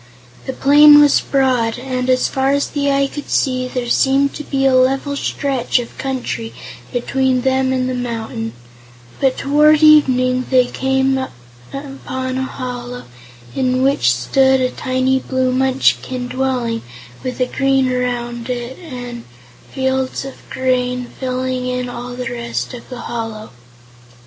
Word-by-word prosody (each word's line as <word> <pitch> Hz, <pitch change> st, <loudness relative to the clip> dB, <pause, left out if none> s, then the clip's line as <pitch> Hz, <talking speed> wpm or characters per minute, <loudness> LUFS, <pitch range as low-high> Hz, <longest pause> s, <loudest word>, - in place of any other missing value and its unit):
The 265 Hz, -, -2 dB
plain 295 Hz, +2 st, +7 dB
was 290 Hz, -1 st, +5 dB
broad, 255 Hz, -4 st, +1 dB
and 255 Hz, 0 st, -3 dB
as 255 Hz, 0 st, +3 dB
far 265 Hz, 0 st, 0 dB
as 280 Hz, 0 st, +1 dB
the 285 Hz, -1 st, -1 dB
eye 275 Hz, 0 st, +2 dB
could 290 Hz, +1 st, -7 dB
see, 255 Hz, -1 st, +1 dB
there 250 Hz, -1 st, -4 dB
seemed 275 Hz, +3 st, +2 dB
to 300 Hz, -, -6 dB
be 270 Hz, -2 st, -1 dB
a 265 Hz, -, +4 dB
level 270 Hz, +2 st, +2 dB
stretch 275 Hz, -3 st, -1 dB
of 240 Hz, -1 st, -4 dB
country 125 Hz, -, -4 dB, 0.4 s
between 260 Hz, +1 st, 0 dB
them 265 Hz, 0 st, +1 dB
and 255 Hz, -1 st, 0 dB
the 255 Hz, -, -2 dB
mountain, 225 Hz, -, -4 dB, 0.7 s
but 265 Hz, -1 st, +1 dB
toward 300 Hz, +2 st, +4 dB
evening 255 Hz, -4 st, +5 dB
they 255 Hz, -1 st, +4 dB
came 265 Hz, +1 st, 0 dB
upon 260 Hz, -, -6 dB
a -, -, -1 dB
hollow, 245 Hz, -2 st, -6 dB, 0.5 s
in 255 Hz, 0 st, 0 dB
which 265 Hz, -, +3 dB
stood 265 Hz, -, +2 dB
a 255 Hz, 0 st, 0 dB
tiny 260 Hz, +1 st, 0 dB
blue 260 Hz, -1 st, -1 dB
Munchkin 260 Hz, -1 st, +1 dB
dwelling 250 Hz, -3 st, -1 dB, 0.4 s
with 255 Hz, 0 st, -4 dB
a 255 Hz, -, +3 dB
garden 270 Hz, -1 st, +1 dB
around 240 Hz, -1 st, -3 dB
it 245 Hz, +1 st, -4 dB
and 245 Hz, -8 st, -8 dB, 0.5 s
fields 265 Hz, 0 st, -1 dB
of 270 Hz, -, -11 dB
grain 250 Hz, -1 st, -1 dB
filling 255 Hz, -1 st, -2 dB
in 250 Hz, 0 st, -2 dB
all 245 Hz, 0 st, -7 dB
the 250 Hz, -1 st, -4 dB
rest 235 Hz, +1 st, -4 dB
of 245 Hz, -, -10 dB
the 250 Hz, -2 st, -7 dB
hollow. 225 Hz, -2 st, -5 dB
255 Hz, 145 wpm, -18 LUFS, 245-265 Hz, 0.7 s, plain